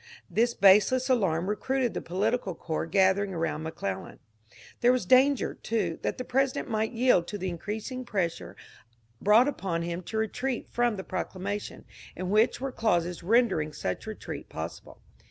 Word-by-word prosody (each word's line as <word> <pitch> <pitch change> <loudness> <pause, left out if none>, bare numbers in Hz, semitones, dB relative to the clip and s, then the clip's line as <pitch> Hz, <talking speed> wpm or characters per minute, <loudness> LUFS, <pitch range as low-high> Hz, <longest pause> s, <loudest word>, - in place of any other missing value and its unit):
This 235 +1 +2
baseless 210 +7 +5
alarm 185 -8 +1
ro 210 - 0
cruited 260 0 -1
the - - -3
political 200 +2 -1
corps 160 0 -3
gathering 190 +2 +2
around 160 -2 -2
McClellan. 155 -12 -5 0.6
There 245 - +5
was 255 -6 0
danger, 260 +6 +4
too, 200 -8 -2
that - - -2
the 255 - -3
President 270 +1 0
might 220 -2 -1
yield 235 -8 +3
to 205 - -4
the 190 -1 -3
increasing 215 +8 -5
pressure 185 -8 -3 0.7
brought 220 +6 +5
upon 185 -11 -2
him 170 +1 -3
to 220 - -4
retreat 240 +3 -2
from 240 -2 +1
the 190 - -6
proclamation, 190 +3 -5 0.3
in 185 +1 -4
which 215 +3 +3
were 270 +1 -3
clauses 175 -7 0
rendering 185 -7 +2
such 90 - -4
re - - -4
treat - - -8
possible. - - -8
205 Hz, 160 wpm, -28 LUFS, 175-240 Hz, 0.7 s, baseless